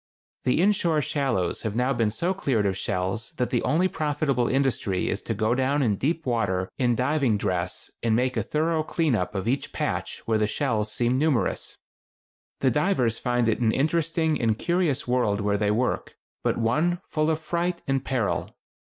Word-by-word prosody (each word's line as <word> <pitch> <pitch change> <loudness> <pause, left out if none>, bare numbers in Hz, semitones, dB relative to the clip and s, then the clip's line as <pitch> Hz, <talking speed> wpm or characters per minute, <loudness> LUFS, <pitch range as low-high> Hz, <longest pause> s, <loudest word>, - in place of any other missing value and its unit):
The 125 - +2
inshore 170 -5 +2
shallows 130 - -1
have 110 -2 -3
now 125 +3 +2
been 115 -4 +1
so 170 - -1
cleared 130 - 0
of 95 -1 +1
shells 95 +4 -2
that 125 - -2
the 120 - +1
only 165 +7 +2
profitable 145 -7 0
industry 130 -8 0
is 100 - -2
to 115 - -3
go 110 +3 +1
down 135 +3 +1
in 110 -5 +2
deep 160 - -1
water 100 -7 0
in 120 -2 +2
diving 130 -2 +1
dress 90 -3 -2
and 115 -2 +2
make 125 +2 +1
a - - +1
thorough 160 +1 0
clean 155 -2 0
up 90 -3 -1
of 95 +2 -2
each 135 +4 -1
"patch" - - -3
where 110 -1 +1
the 105 - +2
shells 110 -4 -1
seem 120 +3 +1
numerous. 150 -5 0 0.8
The 130 - +3
divers 130 - +1
find 120 -1 +1
it 110 - +1
an 115 -2 +3
interesting 160 +2 +1
and 110 -2 +2
curious 170 -6 0
world 120 -5 +1
where 100 0 +1
they 105 -1 +1
work, 120 +4 -1 0.3
but - - +1
one 155 +10 +1
full 155 0 0
of 160 -1 +1
fright 170 +2 -2
and 135 -1 0
peril. 125 -6 -1
125 Hz, 185 wpm, -25 LUFS, 110-155 Hz, 0.8 s, The